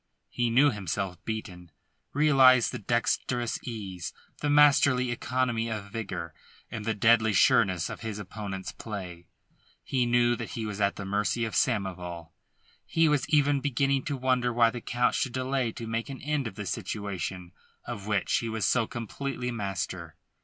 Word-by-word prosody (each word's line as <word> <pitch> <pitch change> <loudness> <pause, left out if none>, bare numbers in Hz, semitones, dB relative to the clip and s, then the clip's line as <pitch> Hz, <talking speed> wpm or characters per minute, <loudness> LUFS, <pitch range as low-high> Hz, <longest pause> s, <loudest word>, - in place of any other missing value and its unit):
He 120 -1 0
knew 135 +5 +5
himself 95 -2 -4
beaten, 95 -6 -5 0.4
realised 135 -4 +5
the - - -5
dexterous 120 +2 0
ease, 100 -7 -6 0.3
the 145 - -1
masterly 140 -4 +5
economy 120 -1 -1
of 105 -3 -5
vigour 100 -7 -5 0.4
and 105 -2 -5
the 110 -1 0
deadly 110 +1 +4
sureness 95 -3 +4
of - - -7
his 110 -3 -4
opponent's 100 -1 -6
play. 90 -6 -7 0.6
He 125 -2 0
knew 120 0 +3
that 115 - -6
he 115 - -3
was 105 -1 -4
at 100 0 +2
the 100 - -6
mercy 105 +4 0
of 110 - -5
Samoval; 90 -7 -1 0.5
he 165 0 +2
was 150 -4 +1
even 145 -2 +3
beginning 135 0 +1
to 145 -3 -2
wonder 125 -1 +1
why 115 -1 +4
the 120 - -6
Count 125 +1 +1
should 125 - -1
delay 130 -2 -1
to 115 - -7
make 115 +2 -3
an 135 - -6
end 145 -3 -1
of 110 - -9
a 105 - -4
situation 95 -3 -4 0.3
of 105 -4 -6
which 105 -3 +1
he 115 - -2
was 110 -1 -1
so 115 -3 +2
completely 125 +2 -4
master. 95 -6 -4
115 Hz, 165 wpm, -28 LUFS, 100-125 Hz, 0.6 s, knew